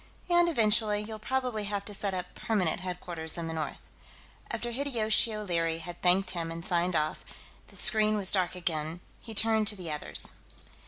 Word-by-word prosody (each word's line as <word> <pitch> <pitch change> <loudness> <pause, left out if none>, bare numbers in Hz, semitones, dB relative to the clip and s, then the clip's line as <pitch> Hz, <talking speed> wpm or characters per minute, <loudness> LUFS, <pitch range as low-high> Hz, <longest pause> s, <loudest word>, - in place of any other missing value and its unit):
And, 345 0 +5
eventually, 215 -6 +2
you'll 215 0 -8
probably 250 -2 -2
have 200 0 -3
to 205 - -4
set 195 -1 -3
up 180 0 -6
permanent 190 -8 -1
headquarters 175 -3 -4
in 170 -1 -4
the 160 - -4
north." 160 -1 -5 0.7
After 240 - -3
Hideyoshi 230 -4 +1
O'Leary 170 -6 -1
had 175 +1 -9
thanked 180 +1 +3
him 165 -2 -4
and 165 +1 -6
signed 180 -2 0
off, 155 0 -1 0.4
and - - -17
the - - +2
screen 215 -1 +6
was 195 -2 +4
dark 185 -2 0
again, 165 -1 -3 0.2
he 225 -2 -9
turned 220 0 +2
to 210 - +2
the 180 -5 -7
others. 150 - +3
195 Hz, 180 wpm, -29 LUFS, 170-215 Hz, 0.7 s, screen